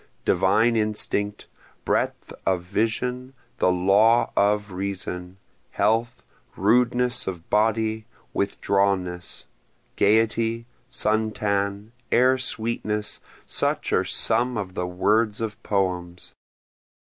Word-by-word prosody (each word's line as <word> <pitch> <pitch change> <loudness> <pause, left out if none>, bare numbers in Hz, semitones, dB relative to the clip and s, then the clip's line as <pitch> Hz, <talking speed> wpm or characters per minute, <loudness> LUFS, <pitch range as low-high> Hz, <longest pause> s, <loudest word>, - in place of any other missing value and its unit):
Divine 115 +2 +3
instinct, 105 -1 -1 0.4
breadth - - -1
of 90 -2 0
vision, 125 +6 -2 0.2
the 90 - +3
law 100 +6 +3
of 105 0 +1
reason, 90 -1 -5 0.3
health, 115 +4 0 0.3
rudeness 125 +4 +2
of 90 -3 -5
body, 110 +1 +1 0.3
withdrawnness, 100 -3 -1 0.5
Gayety, 115 +2 +2 0.2
sun 110 -1 +1
tan, 100 0 -2 0.2
air 130 +1 +4
sweetness, 110 -3 -2 0.3
such - - 0
are - - +3
some 120 +2 +2
of 95 -3 -4
the 90 -1 -3
words 105 +4 +1
of 110 -2 -4
poems. 90 -3 -2
105 Hz, 95 wpm, -24 LUFS, 95-115 Hz, 0.5 s, air